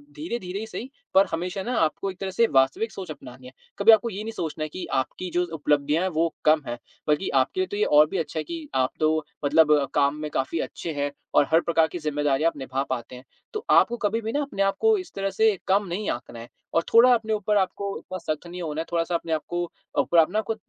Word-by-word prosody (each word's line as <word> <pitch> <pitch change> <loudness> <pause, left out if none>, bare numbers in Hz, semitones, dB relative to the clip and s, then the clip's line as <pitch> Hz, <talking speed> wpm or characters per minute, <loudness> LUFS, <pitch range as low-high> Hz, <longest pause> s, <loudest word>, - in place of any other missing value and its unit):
धीरे-धीरे 235 - -4
ही 220 - -4
सही 240 +3 -7 0.2
पर 195 +1 +6
हमेशा 180 +4 -3
ना 245 +3 -2
आपको 165 +4 0
एक 185 - -14
तरह 195 - -3
से 230 +5 +3
वास्तविक 135 +12 +2
सोच 185 -4 -7
अपनानी 130 -3 -11
है। - - -11 0.3
कभी 210 +3 +8
आपको 225 +1 +4
ये 210 -1 -5
नहीं 225 - -4
सोचना 155 -4 -3
कि 175 +4 -7
आपकी 135 +7 -2
जो 180 0 +1
उपलब्धियाँ 150 0 +1
हैं 190 - +1
वो 165 -1 0
कम 155 0 +5
हैं, 120 0 -4 0.3
बल्कि 150 +5 +1
आपके 130 - -3
लिए 185 - +1
तो 205 - -5
ये 210 - +2
और 150 +1 +6
भी 195 - -2
अच्छा 160 -1 -3
है - - -2
कि 330 -3 -7
आप 130 0 +2
तो 155 0 +1 0.2
मतलब 150 +1 +5 0.2
काम 140 0 +2
में 150 - -3
काफ़ी 135 +5 -1
अच्छे 165 - -4
हैं 145 0 -2 0.2
और - - +6
हर 165 +1 +5
प्रकार 165 -2 +2
की 175 +3 -6
ज़िम्मेदारी 145 -2 0
आप 165 -2 +1
निभा 135 0 -2
पाते 125 0 -4
हैं। 125 - -11 0.3
तो 430 0 -4
आपको 240 - +5
कभी 220 +1 0
भी 220 0 -3
ना 290 - 0
अपने 275 -9 -1
आपको 435 - +3
इस 370 -3 -7
तरह 195 0 -1
से 215 +1 +2
कम 200 +2 +3
नहीं 190 +4 -3
आँकना 120 -1 -7
है 115 - -9 0.3
और 165 - +3
थोड़ा 245 +2 +8
अपने 220 -2 0
ऊपर 210 0 +1
आपको 200 +1 -1
इतना 185 - -7 0.2
सख्त 155 +3 -12
नहीं 180 +1 -7
होना 155 -2 -3
है, - - -5
थोड़ा-सा 170 0 0
अपने 165 -1 -2
आपको 175 +3 -2 0.4
ऊपर 170 - 0
आप 160 +1 +4
ना 215 - +1
आपको 220 +1 -2
170 Hz, 245 wpm, -25 LUFS, 150-205 Hz, 0.4 s, कभी